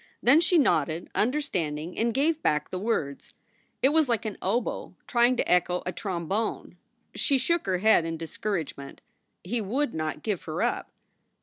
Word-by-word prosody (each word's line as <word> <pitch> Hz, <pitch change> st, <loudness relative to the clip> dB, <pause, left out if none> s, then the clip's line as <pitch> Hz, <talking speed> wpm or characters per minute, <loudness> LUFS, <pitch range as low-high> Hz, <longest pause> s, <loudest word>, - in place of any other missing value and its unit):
Then 280 Hz, +7 st, +6 dB
she 355 Hz, 0 st, +4 dB
nodded, 160 Hz, -, +1 dB
understanding, 180 Hz, -, -1 dB
and 230 Hz, +1 st, +1 dB
gave 305 Hz, +6 st, +1 dB
back 150 Hz, -1 st, 0 dB
the 185 Hz, -, -3 dB
words. 165 Hz, -10 st, -3 dB, 0.5 s
It 265 Hz, -, +7 dB
was 310 Hz, -2 st, +3 dB
like 230 Hz, -1 st, 0 dB
an 215 Hz, -, -3 dB
oboe 215 Hz, -1 st, -2 dB
trying 240 Hz, +1 st, +3 dB
to -, -, 0 dB
echo 180 Hz, 0 st, +2 dB
a 180 Hz, -, -3 dB
trom 170 Hz, -3 st, -4 dB
bone. 215 Hz, +5 st, -2 dB, 0.4 s
She 280 Hz, -, +2 dB
shook 320 Hz, +2 st, 0 dB
her 185 Hz, -1 st, +1 dB
head 215 Hz, -2 st, +4 dB
in 165 Hz, 0 st, -3 dB
discouragement. 160 Hz, -4 st, -5 dB, 0.4 s
He 225 Hz, +6 st, -2 dB
would 240 Hz, +7 st, -1 dB
not 155 Hz, -1 st, -3 dB
give 210 Hz, -5 st, -2 dB
her 155 Hz, -, -2 dB
up. -, -, -1 dB
205 Hz, 170 wpm, -27 LUFS, 165-250 Hz, 0.5 s, It